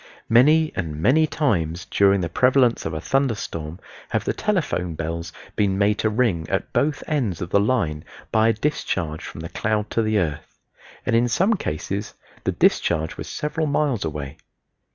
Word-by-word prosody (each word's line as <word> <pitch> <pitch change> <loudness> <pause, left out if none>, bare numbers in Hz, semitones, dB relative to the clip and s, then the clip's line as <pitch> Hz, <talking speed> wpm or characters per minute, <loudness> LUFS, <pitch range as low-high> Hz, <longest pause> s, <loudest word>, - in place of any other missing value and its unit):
Many 150 +7 +5
and 80 -4 -3
many 155 - +4
times 90 - -1
during 100 -1 +3
the 85 - -1
prevalence 125 - +3
of 80 - -5
a - - -2
thunder 135 - +1
storm 80 -3 -6 0.3
have - - 0
the - - 0
telephone 150 - -1
bells 85 +1 -4 0.2
been 100 -2 +1
made 105 +1 +2
to 110 - +2
ring 105 -8 0
at - - -2
both 150 +1 +1
ends 120 - -1
of 85 - -5
the 100 - +4
line 100 -9 0 0.3
by 110 0 +4
a 115 - +4
discharge 95 - -2
from - - -8
the 85 - -6
cloud 105 -1 -1
to 115 - +1
the 110 -1 +1
earth, 80 -7 -3 0.5
and 115 - +1
in 120 +1 +3
some 190 - +2
cases 100 - -3 0.3
the - - +2
discharge 80 -1 +1
was - - -7
several 155 +1 -2
miles 140 -6 0
away. 75 -4 -5
105 Hz, 175 wpm, -23 LUFS, 85-130 Hz, 0.5 s, Many